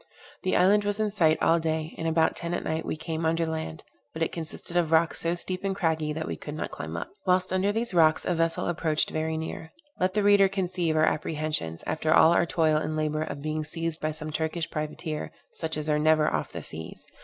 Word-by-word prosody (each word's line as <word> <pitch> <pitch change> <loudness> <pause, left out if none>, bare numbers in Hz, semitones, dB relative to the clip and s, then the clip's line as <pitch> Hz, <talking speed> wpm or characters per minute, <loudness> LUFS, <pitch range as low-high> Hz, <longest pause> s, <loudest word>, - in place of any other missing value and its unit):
The 185 - +1
island 205 +3 +5
was 205 +1 -1
in 215 -1 +1
sight 160 -6 +3
all 165 +1 +4
day, 160 0 -2
and 165 - -3
about 160 0 +2
ten 170 +1 -2
at - - -3
night 160 +1 -2
we - - -1
came 160 +1 -4
under 165 +1 +1
the 160 - -3
land, 160 - -5 0.3
but 160 - -1
it - - -1
consisted 165 +1 -7
of 170 -3 +2
rocks 165 0 +3
so 170 +1 0
steep 185 +2 -4
and 195 -1 -1
craggy 160 -4 0
that 160 +1 -3
we - - -3
could 150 - -7
not 155 - -4
climb 80 +2 -5
up. 85 - -5 0.2
Whilst 185 0 +2
under 190 +2 +2
these 225 0 -1
rocks 160 -2 +4
a 180 - +1
vessel 165 0 0
approached 160 -2 0
very 160 0 -1
near. 160 0 -6 0.3
Let 185 +2 +1
the 210 - +2
reader 200 -1 +6
conceive 180 -4 -1
our 155 0 +4
apprehensions, 150 - -2
after 155 0 -1
all 160 - +7
our 170 - +3
toil 160 -2 +2
and 155 0 -2
labor, 155 0 0
of 145 -2 -5
being 155 0 -2
seized 165 +1 -3
by 155 - 0
some 155 0 -5
Turkish 160 +1 -2
privateer, 155 +1 -4 0.2
such 160 -1 -3
as 150 0 -3
are 150 -1 +2
never 155 0 +3
off - - -2
the - - -6
seas. 80 0 -7
160 Hz, 235 wpm, -27 LUFS, 155-175 Hz, 0.3 s, all